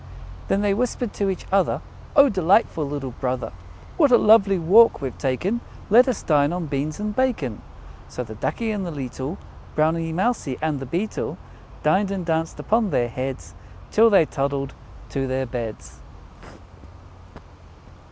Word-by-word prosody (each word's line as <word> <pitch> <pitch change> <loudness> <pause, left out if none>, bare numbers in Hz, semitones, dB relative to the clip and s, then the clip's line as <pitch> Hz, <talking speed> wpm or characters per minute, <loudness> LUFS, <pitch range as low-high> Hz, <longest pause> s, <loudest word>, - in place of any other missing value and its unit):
"Then 200 - +1
they 205 -1 +2
whispered 245 0 -2
to 200 -1 -1
each 190 - -4
other, 195 -1 +2 0.4
'O 280 -1 +8
delightful 185 - +2
little 140 -3 -4
brother, 130 -1 -2 0.5
What 290 -6 +4
a 240 - +8
lovely 205 -3 +5
walk 200 +8 +5
we've 135 -4 -4
taken! 180 - -1 0.3
Let 245 +5 +7
us 250 -5 -2
dine 145 -1 +3
on 175 -1 -3
Beans 145 +2 -3
and 210 0 -3
Bacon!' 210 - -1 0.5
So 125 - -5
the 110 - -9
Ducky 220 - -2
and 205 -2 -2
the 180 - -4
leetle 140 +2 -5 0.4
Browny 165 +1 +1
Mousy, 180 - -1
and 155 -2 -1
the 135 - -7
Beetle 180 - -3 0.5
Dined, 195 +1 +2
and 195 -3 -3
danced 165 -1 -1
upon 220 -1 +1
their 120 -8 0
heads, 130 +2 -5 0.4
Till 225 +1 +6
they 195 -6 +5
toddled 140 -1 -2 0.4
to 135 -1 -2
their 130 +1 -1
beds." 115 -3 -6
165 Hz, 150 wpm, -23 LUFS, 135-210 Hz, 0.5 s, O